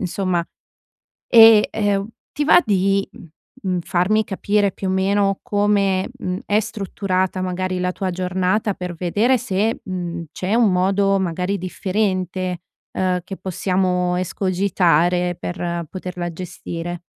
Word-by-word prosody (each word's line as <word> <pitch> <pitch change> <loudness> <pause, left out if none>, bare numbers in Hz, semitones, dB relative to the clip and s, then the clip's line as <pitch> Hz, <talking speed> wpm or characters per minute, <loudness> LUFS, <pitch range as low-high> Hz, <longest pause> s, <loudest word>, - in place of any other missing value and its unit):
insomma. 180 -2 -1 0.9
E, 225 -2 +8
ehm, 205 -1 0 0.2
ti 295 - -1
va 350 - +7
di, 195 0 +1
uhm, 170 - -13 0.3
mhmm, 185 -2 0
farmi 190 +5 +1
capire 205 0 0
più 195 - -5
o - - +1
meno 195 +1 +1
come, 200 -2 +1
uhm, 180 +1 -4
è 205 +1 +2
strutturata 190 -3 -2
magari 185 0 -2
la 180 0 0
tua 190 -1 -3
giornata 185 +3 0
per 180 -2 -6
vedere 210 +9 +2
se, 220 0 -1
uhm, 175 -3 -4
c'è 190 +3 -3
un 230 -5 +4
modo 195 +2 +2
magari 185 +2 -1
differente, 185 -1 -2 0.3
ehm, 185 -1 0
che 195 0 -7
possiamo 180 -1 0
escogitare 180 -2 +1
per 170 -1 -3
poterla 180 -2 -5
gestire? 175 0 -6
185 Hz, 130 wpm, -21 LUFS, 180-200 Hz, 0.9 s, E